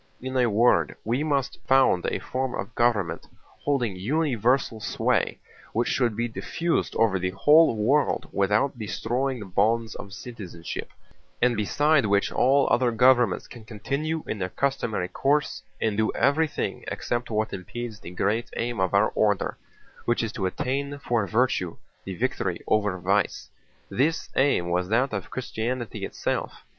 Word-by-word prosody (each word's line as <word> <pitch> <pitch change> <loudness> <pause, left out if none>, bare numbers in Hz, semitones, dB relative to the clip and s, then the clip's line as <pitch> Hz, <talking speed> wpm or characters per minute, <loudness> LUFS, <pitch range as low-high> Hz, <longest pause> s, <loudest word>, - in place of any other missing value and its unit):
In 130 +1 -5
a 125 -2 +3
word, 105 -7 +3
we 120 +6 0
must 140 -4 -1
found 130 -9 +4
a - - 0
form 130 0 -3
of 115 - -5
government 100 -9 0 0.4
holding 125 -8 0
universal 125 - +1
sway, - - 0 0.4
which 120 +2 +1
should 120 -5 +1
be 120 0 0
diffused 165 +8 -2
over 105 -4 +2
the 90 0 -1
whole 150 - +5
world 135 +7 +2
without 105 +7 +1
destroying 125 +4 -2
the 105 - -7
bonds 110 +4 +1
of 100 - -9
citizenship, 95 -7 -7 0.5
and 125 -1 +3
beside 140 +5 +2
which 100 0 +2
all 135 +2 +3
other 125 -1 +3
governments 120 -3 +3
can 120 - -12
continue 140 +9 -3
in 110 - -4
their 90 -1 -2
customary 115 -7 -1
course 140 +8 0 0.2
and 110 -2 0
do 110 0 +2
everything 145 +4 0
except 120 0 -3
what 110 -1 -1
impedes 110 +4 -6
the - - -9
great 105 +6 -1
aim 120 -2 -2
of 95 +1 +1
our 100 +2 +4
order, 105 -3 +1 0.5
which 120 0 +1
is 110 - -2
to 95 -3 -2
obtain 140 +8 -2
for 120 -7 -1
virtue 110 -7 0 0.3
the 95 - -5
victory 95 -6 -1
over 105 -3 +1
vice. 95 +3 0 0.4
This 155 +6 0
aim 130 -11 +2
was 90 +1 0
that 125 +4 +2
of 100 -3 -4
Christianity 120 -2 -3
itself. - - -3
115 Hz, 150 wpm, -26 LUFS, 100-130 Hz, 0.5 s, whole